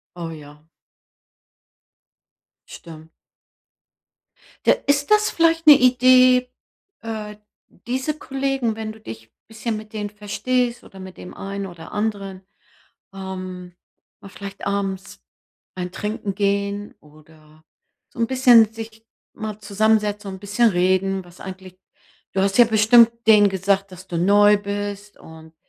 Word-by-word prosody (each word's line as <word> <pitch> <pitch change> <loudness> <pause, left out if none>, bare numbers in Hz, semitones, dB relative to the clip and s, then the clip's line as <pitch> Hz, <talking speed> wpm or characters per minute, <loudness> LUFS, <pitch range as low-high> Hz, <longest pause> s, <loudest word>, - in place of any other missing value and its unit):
Oh, 170 -2 -6
ja. 150 -1 -12 2.1
Stimmt. 160 -1 -12 1.6
Ja, - - +6
ist 285 +3 +1
das 425 0 +4
vielleicht 330 -1 +1
'ne 300 - +11
Idee, 255 0 +5 0.5
äh, 215 -2 -6 0.3
diese 260 +5 -4
Kollegen, 270 -5 -2
wenn 220 -1 -5
du 220 - -17
dich 110 - -11 0.2
bisschen 225 0 -4
mit 215 +1 -10
denen 210 -2 -4
verstehst 235 +4 -2
oder 190 - -14
mit 185 0 -10
dem 180 - -10
einen 195 0 -6
oder 170 -3 -11
anderen, 200 -3 -4 0.7
ähm, 185 -2 -8 0.5
mal 195 - -12
vielleicht 200 0 -9
abends 195 -1 -3 0.5
ein 180 -1 -5
Trinken 210 -1 -4
gehen 200 0 -2
oder 155 +1 -21 0.5
so - - -9
'n 230 - +2
bisschen 245 -4 +5
sich 225 0 -10 0.3
mal 215 -1 -6
zusammensetzen 210 0 0
und 190 - -9
bisschen 205 +4 +2
reden, 190 +1 0
was 175 0 -18
eigentlich 185 -1 -10 0.5
du 190 - -1
hast 195 +2 0
ja 240 - +9
bestimmt 225 +1 +5 0.2
denen 210 -2 +6
gesagt, 195 +1 -1
dass 185 +1 -12
du 170 - -4
neu 205 +3 +5
bist 205 0 -6
und, 160 0 -15
205 Hz, 130 wpm, -21 LUFS, 190-225 Hz, 2.1 s, ne